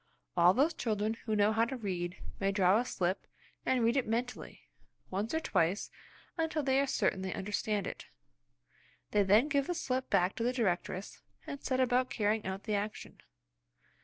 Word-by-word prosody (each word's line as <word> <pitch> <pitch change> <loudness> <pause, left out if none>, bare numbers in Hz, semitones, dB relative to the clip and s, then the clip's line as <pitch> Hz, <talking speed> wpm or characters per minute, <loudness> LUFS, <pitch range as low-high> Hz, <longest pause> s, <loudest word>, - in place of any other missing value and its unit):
All 175 +1 +6
those 295 +6 +3
children 215 -5 -1
who 220 -1 0
know 210 +1 +4
how 225 +1 +3
to 265 +2 -4
read 180 -5 -3 0.2
may 195 0 +1
draw 195 +1 +4
a 245 - -1
slip, 185 -4 -2 0.4
and 255 -2 +3
read 230 +1 +3
it 270 - +1
mentally 245 +3 -3 0.5
once 200 +4 -2
or 320 - +1
twice 185 - 0 0.5
until 320 -2 0
they 265 0 +3
are 280 - +2
certain 190 - +1
they 190 -1 -3
understand 205 0 -1
it. - - -7 1.0
They 210 - +4
then 205 +7 +5
give 280 -2 +1
the 355 - -1
slip 260 -5 -2
back 180 +2 +2
to 230 - -1
the 245 +2 +1
directress 195 -4 -2 0.2
and 280 - -6
set 260 -1 0
about 255 0 +2
carrying 215 -1 0
out 190 +1 -4
the 215 - -2
action. 205 +1 -4
220 Hz, 180 wpm, -32 LUFS, 195-255 Hz, 1.0 s, All